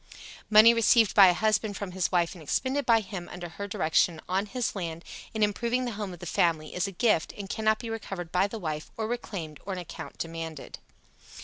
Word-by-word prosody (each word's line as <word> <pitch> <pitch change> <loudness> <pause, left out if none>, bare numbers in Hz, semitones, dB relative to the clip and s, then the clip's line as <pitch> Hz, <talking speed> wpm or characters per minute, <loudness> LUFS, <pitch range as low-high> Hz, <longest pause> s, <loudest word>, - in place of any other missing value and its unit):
Money 220 +2 +8
received 230 -1 +4
by 195 -2 +9
a 180 - +5
husband 215 0 0
from 200 -3 -5
his 185 -1 -1
wife 175 -2 +1
and 175 - -12
expended 265 - -1
by 230 -2 +5
him, 190 -4 -7
under 175 -1 -7
her 200 +4 -6
direction, 165 -4 +1
on 190 +3 0
his 245 +1 -2
land, 170 -3 -5 0.3
in 220 -1 0
improving 235 +4 0
the 240 - -2
home 205 -2 -5
of 175 - -9
the 175 - -9
family, 160 -2 0
is 180 +2 -1
a - - -5
gift, 195 -3 +1
and 200 -2 -7
cannot 215 0 +1
be 235 - -7
recovered 195 -6 -5
by 185 +2 +2
the 225 - -6
wife, 155 -5 -4
or 220 - -2
reclaimed, 190 -10 -5
or 195 - -4
an - - -4
account 175 - -9
demanded. 165 -2 -6
195 Hz, 215 wpm, -28 LUFS, 175-220 Hz, 0.3 s, by